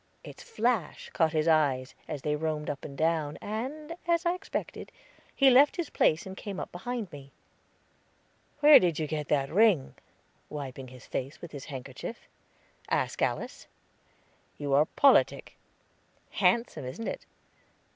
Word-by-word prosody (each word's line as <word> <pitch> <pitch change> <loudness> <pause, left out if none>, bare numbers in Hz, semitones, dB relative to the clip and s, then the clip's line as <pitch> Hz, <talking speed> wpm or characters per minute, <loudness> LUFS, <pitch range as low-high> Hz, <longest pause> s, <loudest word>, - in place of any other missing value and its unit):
Its - - -11
flash 240 - -2
caught 160 -2 +2
his 155 0 0
eyes, 140 -5 +2
as 150 -4 -5
they 150 0 0
roamed 150 -1 -2
up 140 - -8
and 140 -2 -8
down, 155 -2 0
and, 280 +10 -5
as 340 0 +2
I 345 - +3
expected, 365 +2 -6 0.4
he 270 -1 +6
left 275 +4 +6
his 345 -4 -4
place 155 - +2
and 190 0 -7
came 200 -1 -6
up - - -6
behind 225 +2 -5
me. 140 -2 -11 1.3
"Where 295 0 +10
did 170 -4 +1
you 155 - -1
get 150 -1 -3
that 140 -2 0
ring?" 195 -9 +4 0.6
wiping 135 -3 -6
his 130 0 -13
face 135 +3 -5
with 175 - -9
his 140 -2 -8
handkerchief. 135 -4 -7 0.7
"Ask - - -1
Alice." - - -2 0.9
"You 145 -1 -2
are 145 +2 +5
politic." 280 -1 +3 0.8
"Handsome, 230 - +1
isn't 130 - -6
it?" - - -5
160 Hz, 145 wpm, -29 LUFS, 145-235 Hz, 1.3 s, Where